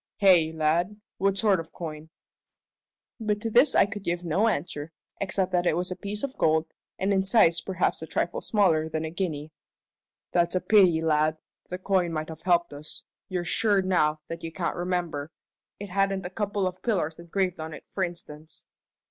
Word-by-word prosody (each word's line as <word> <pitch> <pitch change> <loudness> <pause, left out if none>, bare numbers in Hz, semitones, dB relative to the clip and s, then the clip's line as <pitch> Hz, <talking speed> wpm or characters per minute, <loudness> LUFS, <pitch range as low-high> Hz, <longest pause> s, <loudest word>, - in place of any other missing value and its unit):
"Hey, 180 -5 +5
lad? 165 +6 0 0.2
What 195 0 +2
sort 200 -2 +4
of 165 0 -8
coin?" 155 -2 -7 1.1
But 210 -2 0
to 225 - -2
this 245 +7 +5
I - - +6
could 205 0 -6
give 175 -1 -2
no 185 +7 +2
answer, 150 -5 -2 0.3
except 190 -1 -1
that 180 -1 +1
it 160 - +2
was 180 +1 -2
a - - -2
piece 205 +2 -5
of 275 -1 -3
gold, 160 0 +3 0.3
and 195 +2 +1
in 190 -1 +2
size 190 -5 +4
perhaps 185 -4 -1
a 160 - -6
trifle 175 - -1
smaller 165 -7 +2
than 160 0 -2
a 160 - -5
guinea. 160 -4 -3 0.8
"That's 170 0 +2
a - - +3
pity, 180 -6 +4
lad. 155 0 +2 0.3
The 180 - -3
coin 185 -2 +1
might 155 -1 -3
have 160 -1 -9
helped 175 -3 +2
us. 145 +2 -8 0.3
You're 180 -2 -2
sure 205 0 +2
now 155 -5 +2
that 165 0 -7
you 165 - -4
can't 170 0 -2
remember? 175 -5 -2 0.5
It 205 0 -7
hadn't 195 0 0
a 180 - -5
couple 205 -1 -1
of 185 0 -4
pillars 170 -9 -1
engraved 180 +1 -1
on 160 0 -5
it, - - -9
for 190 - -2
instance?" 165 -3 -7
175 Hz, 190 wpm, -27 LUFS, 160-195 Hz, 1.1 s, I